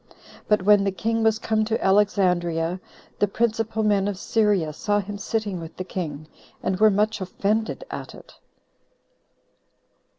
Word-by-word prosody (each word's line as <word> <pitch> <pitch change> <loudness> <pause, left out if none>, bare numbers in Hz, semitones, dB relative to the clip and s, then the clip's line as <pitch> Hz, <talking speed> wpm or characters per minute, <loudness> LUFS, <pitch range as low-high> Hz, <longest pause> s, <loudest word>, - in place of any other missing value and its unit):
But 210 -3 +2
when 205 0 +5
the 195 - +1
king 225 +5 -1
was 220 -1 +3
come 220 -1 0
to 225 +1 -1
Alexandria, 180 -4 +2 0.4
the 205 - +3
principal 225 +1 -1
men 205 -2 +2
of 205 -2 -3
Syria 200 -7 +1
saw 205 +6 0
him 205 +1 -6
sitting 205 -3 -2
with 165 0 -9
the 185 - -3
king, 155 -5 -5 0.4
and 185 - -1
were 215 0 +7
much 210 +1 0
offended 210 - -1
at - - -7
it. - - -15
205 Hz, 145 wpm, -24 LUFS, 185-215 Hz, 0.4 s, were